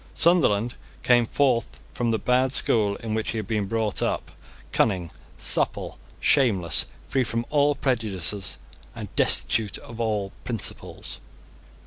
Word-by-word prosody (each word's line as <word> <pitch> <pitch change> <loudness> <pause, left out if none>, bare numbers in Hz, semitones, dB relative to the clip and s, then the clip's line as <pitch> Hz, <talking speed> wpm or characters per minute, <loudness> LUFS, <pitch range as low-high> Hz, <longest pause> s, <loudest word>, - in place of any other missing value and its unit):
Sunderland 120 - +3 0.3
came 120 -2 +4
forth 125 -5 0
from 120 -2 -1
the 115 - +1
bad 130 +3 +1
school 105 -6 +2
in 110 -1 -3
which 110 0 -2
he - - -3
had 105 -3 -4
been 105 -3 -1
brought 110 -1 -1
up, - - -2 0.4
cunning, 90 -6 +1 0.3
supple, - - +2 0.2
shameless, 100 - +3 0.2
free 130 - +1
from 115 0 -3
all 145 -1 +3
prejudices, 105 - -1 0.4
and - - -8
destitute 110 -3 +2
of 115 -1 -11
all 105 -4 -1
principles. 115 -5 -3
115 Hz, 130 wpm, -25 LUFS, 105-125 Hz, 0.4 s, came